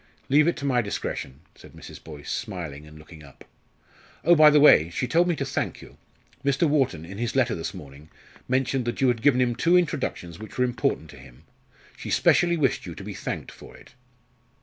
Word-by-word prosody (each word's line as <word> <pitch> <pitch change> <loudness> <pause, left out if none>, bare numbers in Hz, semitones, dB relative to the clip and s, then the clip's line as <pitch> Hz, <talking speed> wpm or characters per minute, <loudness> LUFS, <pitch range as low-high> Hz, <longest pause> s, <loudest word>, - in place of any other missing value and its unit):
"Leave 150 +3 +4
it 170 - 0
to 140 - -6
my 125 -3 +2
discretion," 75 - -5
said - - -16
Mrs. - - -12
Boyce, 75 -3 -9
smiling 80 -9 -6
and 75 0 -14
looking 80 +1 -14
up. 70 -2 -16 0.8
"Oh, 175 - +5
by 155 -2 +7
the 150 0 +5
way, 85 - +6
she 105 +8 -3
told 170 +7 +2
me 175 - +1
to 140 - -3
thank 130 - -3
you. - - -14 0.5
Mr. 140 +4 +2
Wharton, 135 - 0
in 95 +4 -9
his 120 +1 -3
letter 125 -3 +2
this 80 - -4
morning, 70 +2 -12 0.4
mentioned 130 0 0
that 120 - -3
you 130 - +3
had 120 -2 -1
given 130 -1 +3
him 120 -2 +1
two 170 +8 +3
introductions 130 - -2
which 110 -1 -10
were 125 - +3
important 125 - -2
to 75 - -14
him. 65 +1 -16 0.5
She - - -8
specially 170 0 +3
wished 135 -5 0
you - - -7
to - - -9
be - - -7
thanked - - -6
for - - -14
it." - - -18
120 Hz, 210 wpm, -25 LUFS, -, 0.8 s, by